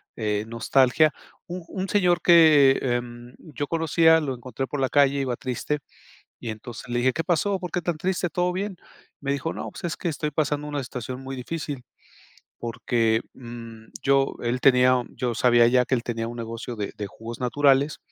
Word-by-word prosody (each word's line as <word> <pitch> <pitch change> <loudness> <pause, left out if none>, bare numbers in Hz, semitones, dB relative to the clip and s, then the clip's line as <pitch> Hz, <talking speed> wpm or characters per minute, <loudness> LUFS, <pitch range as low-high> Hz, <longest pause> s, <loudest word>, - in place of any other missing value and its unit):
eh, 105 -1 -1
nostalgia, 130 +6 +3 0.4
un 180 0 -6
un 190 -1 -4
señor 180 -4 +3
que, 155 -6 +7
em, 120 -1 -3
yo 145 -2 -5
conocía, 160 +1 +4
lo 140 -4 -3
encontré 130 +2 -5
por 145 - -4
la 130 -1 +1
calle, 140 -1 +3
iba 125 -2 -1
triste 130 +4 -3 0.6
y 115 - -6
entonces 110 +2 -8
le 120 0 -1
dije: 130 +1 +2
"¿Qué 165 - -2
pasó?, 185 +4 +1
¿por 180 -2 -6
qué 180 - -1
tan 170 -1 -2
triste?, 180 +1 -1
¿todo 180 +3 0
bien?", 195 -1 -3 0.4
me 140 0 -2
dijo: 140 +3 -2
"No, - - -6
pues - - -8
es 170 - -3
que - - -4
estoy 150 0 -2
pasando 150 0 -1
una 145 -2 -3
situación 125 +1 -6
muy 135 0 -6
difícil, 145 0 -5 0.8
porque, 115 -1 0
mm," 115 -2 -10 0.2
yo 135 0 +2
él 120 +2 -1
tenía 125 -1 +5
yo 125 -1 -3
sabía 120 0 +5
ya 125 0 +4
que 130 - 0
él 120 - -1
tenía 115 -1 -3
un 120 - -7
negocio 115 +1 -5
de 105 -2 -4
de 105 - -4
jugos 115 +4 -9
naturales, 140 +3 +2
135 Hz, 190 wpm, -25 LUFS, 120-155 Hz, 0.8 s, que